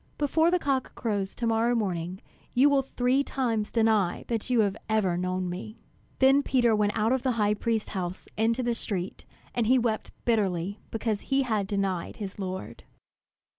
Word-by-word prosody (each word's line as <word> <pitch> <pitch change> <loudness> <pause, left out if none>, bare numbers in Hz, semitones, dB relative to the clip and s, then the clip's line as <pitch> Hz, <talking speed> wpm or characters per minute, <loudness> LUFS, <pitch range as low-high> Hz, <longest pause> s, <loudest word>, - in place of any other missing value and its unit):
"Before 320 +3 +3
the 360 - +3
cock 275 -6 -1
crows 205 -4 -2
to 240 - -3
morrow 230 +1 +2
morning, 185 -4 -2 0.3
you 275 +4 +6
will 280 -1 +4
three 260 +1 +1
times 230 -7 -1
deny 220 -6 +2
that 230 +1 -2
you 245 -3 +4
have 200 -2 +1
ever 210 -5 +2
known 185 +1 -1
me." 185 +5 -6 0.4
Then 270 +1 +5
Peter 245 -5 +3
went 210 0 +1
out 220 +2 +2
of 260 - +1
the 260 -1 +1
high 210 -2 +2
priest's 220 0 -1
house 185 -2 -4
into 230 +3 +1
the 240 0 +1
street; 195 -5 -4 0.3
and 235 -3 0
he 255 +2 +5
wept 230 -3 0 0.2
bitterly 200 -4 0
because 220 -2 -2
he 275 0 +1
had 215 -6 0
denied 195 -3 -2
his 200 -2 -6
Lord. 185 -1 -5
220 Hz, 175 wpm, -27 LUFS, 195-245 Hz, 0.4 s, you